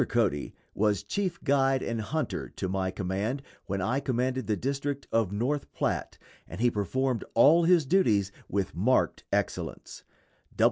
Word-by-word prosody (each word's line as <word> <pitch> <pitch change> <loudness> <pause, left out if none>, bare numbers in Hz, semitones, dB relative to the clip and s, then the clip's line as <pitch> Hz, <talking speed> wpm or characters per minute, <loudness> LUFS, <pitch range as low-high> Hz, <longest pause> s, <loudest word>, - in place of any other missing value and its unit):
Cody 105 -12 0 0.2
was 105 -2 +1
chief 185 - -2
guide 135 -2 +2
and 115 -1 -2
hunter 155 +8 -3
to 95 - -2
my 95 0 -1
command 100 +9 -2 0.2
when 95 0 -2
I 120 +8 +1
commanded 130 -1 -1
the 110 - +2
district 140 +1 -2
of 115 -4 +2
North 130 +8 -1
Platte, - - -2 0.3
and 90 - -8
he 120 +1 +3
performed 125 +4 -1
all 155 +8 +6
his 170 -3 +5
duties 110 - +3 0.2
with 100 -2 -1
marked 115 +9 +1
excellence. - - -3
120 Hz, 145 wpm, -28 LUFS, 100-140 Hz, 0.3 s, all